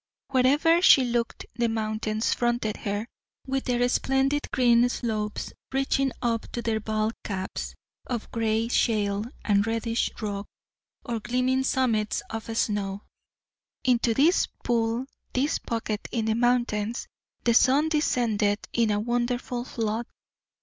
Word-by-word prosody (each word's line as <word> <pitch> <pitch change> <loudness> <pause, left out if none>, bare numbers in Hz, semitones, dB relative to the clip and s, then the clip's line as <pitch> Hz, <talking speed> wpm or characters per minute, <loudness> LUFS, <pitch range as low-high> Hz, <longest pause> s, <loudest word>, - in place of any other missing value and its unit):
Where 255 -1 +3
ever 325 +5 +4
she 275 -7 +7
looked 235 -1 -2
the 235 0 +1
mountains 215 0 -1
fronted 240 -3 0
her, 205 +1 -3 0.4
with 270 0 -2
their 245 -1 +2
splendid 270 +3 +1
green 240 -1 +4
slopes 215 -4 -3 0.2
reaching 270 0 +1
up 230 -2 -1
to 235 - -3
their 220 -1 0
bald 215 +1 -1
caps 190 -2 -4 0.3
of 240 -3 -4
gray 225 0 0
shale 210 -3 +1 0.2
and 205 0 +3
reddish 230 +1 0
rock 205 -2 -4 0.6
or 235 -2 -2
gleaming 255 +3 +1
summits 230 -5 +1
of 225 0 -4
snow. 205 -2 -1 0.8
Into 240 -2 +2
this 315 - +4 0.2
"pool" 230 +1 0 0.3
this 275 +4 +1
pocket 220 -2 -3
in 225 -2 -1
the 220 - +2
mountains 235 -2 0 0.4
the 235 - +3
sun 275 +6 +5
descended 225 -9 +1
in 230 -2 +2
a 205 0 +1
wonderful 240 +1 -1
flood. 225 -1 -2
235 Hz, 130 wpm, -26 LUFS, 215-250 Hz, 0.8 s, she